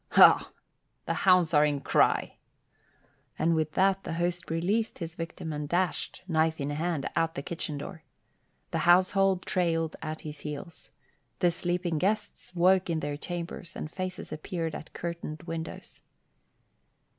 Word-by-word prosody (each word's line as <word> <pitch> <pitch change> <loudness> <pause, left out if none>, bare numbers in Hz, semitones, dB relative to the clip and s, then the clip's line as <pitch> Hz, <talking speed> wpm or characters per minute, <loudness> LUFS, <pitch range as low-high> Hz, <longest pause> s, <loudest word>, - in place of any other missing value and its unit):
"Ha! - - +8 0.6
The - - 0
hounds 180 -4 +4
are 150 0 +6
in 145 -1 +1
cry." - - +2 1.0
And 165 +1 +2
with 155 -2 0
that 195 0 +3
the - - -4
host 175 +2 -2
released 195 +8 0
his 165 -2 -5
victim 165 -1 -5
and 150 -1 -4
dashed, 180 +1 -1
knife 160 -2 +2
in 140 +1 -2
hand, 160 -1 -1
out 165 0 +1
the 140 - -4
kitchen 155 -2 -4
door. 160 +3 -7 0.7
The - - 0
household 185 +1 +4
trailed 165 -3 0
at 155 0 -5
his 150 -1 -7
heels. 150 +3 -7 0.5
The 175 - +3
sleeping 175 -1 -1
guests 210 -1 -2
woke 185 +1 +4
in 160 -2 0
their 145 0 -2
chambers 175 +3 -6
and 155 - -5
faces 185 -1 -5
appeared 160 +1 -3
at 155 - -8
curtained 170 -2 -5
windows. 165 -1 -7
170 Hz, 145 wpm, -29 LUFS, 155-180 Hz, 1.0 s, Ha